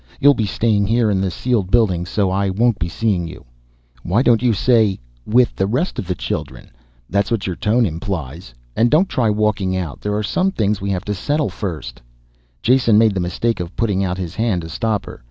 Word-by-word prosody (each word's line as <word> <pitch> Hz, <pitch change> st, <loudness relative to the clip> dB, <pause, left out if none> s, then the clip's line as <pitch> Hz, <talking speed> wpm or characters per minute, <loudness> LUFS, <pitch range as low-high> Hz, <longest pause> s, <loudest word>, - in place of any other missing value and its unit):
You'll 145 Hz, +1 st, +6 dB
be 110 Hz, -5 st, -1 dB
staying 100 Hz, 0 st, +1 dB
here 115 Hz, 0 st, +2 dB
in 95 Hz, -1 st, +1 dB
the 95 Hz, -, 0 dB
sealed 105 Hz, 0 st, -1 dB
buildings 95 Hz, -6 st, +2 dB
so 100 Hz, -2 st, 0 dB
I 100 Hz, +1 st, 0 dB
won't 115 Hz, +4 st, +1 dB
be 85 Hz, 0 st, -2 dB
seeing 95 Hz, -3 st, -1 dB
you." 80 Hz, -, -11 dB, 0.6 s
"Why 105 Hz, +9 st, +1 dB
don't 115 Hz, -4 st, +4 dB
you 125 Hz, -2 st, +3 dB
say 110 Hz, -2 st, +3 dB, 0.3 s
'with 120 Hz, +2 st, +3 dB
the 95 Hz, -, 0 dB
rest 135 Hz, -, -1 dB
of 90 Hz, -, -5 dB
the 90 Hz, -, -1 dB
children' -, -, -5 dB, 0.4 s
that's 100 Hz, +1 st, 0 dB
what 115 Hz, -5 st, -1 dB
your 90 Hz, -, -3 dB
tone 115 Hz, +6 st, +2 dB
implies? 80 Hz, -, -5 dB, 0.2 s
And 120 Hz, -, +3 dB
don't 165 Hz, +8 st, +4 dB
try 120 Hz, -9 st, 0 dB
walking 105 Hz, -3 st, 0 dB
out, 85 Hz, -6 st, -5 dB
there 105 Hz, 0 st, -2 dB
are 105 Hz, -, -1 dB
some 185 Hz, -, +1 dB
things 105 Hz, -2 st, 0 dB
we 100 Hz, -, -3 dB
have 95 Hz, 0 st, -2 dB
to 105 Hz, -, -2 dB
settle 145 Hz, +9 st, -1 dB
first 80 Hz, -, -6 dB, 0.3 s
" -, -, -39 dB
Jason 120 Hz, -3 st, +4 dB
made 110 Hz, -1 st, +4 dB
the 95 Hz, -, -2 dB
mistake 90 Hz, +5 st, -1 dB
of 90 Hz, 0 st, -6 dB
putting 100 Hz, -4 st, 0 dB
out 90 Hz, -1 st, -2 dB
his 90 Hz, -3 st, -5 dB
hand 105 Hz, -6 st, -1 dB
to 80 Hz, -, -8 dB
stop 110 Hz, +1 st, -1 dB
her. -, -, -10 dB
100 Hz, 220 wpm, -19 LUFS, 90-115 Hz, 0.6 s, You'll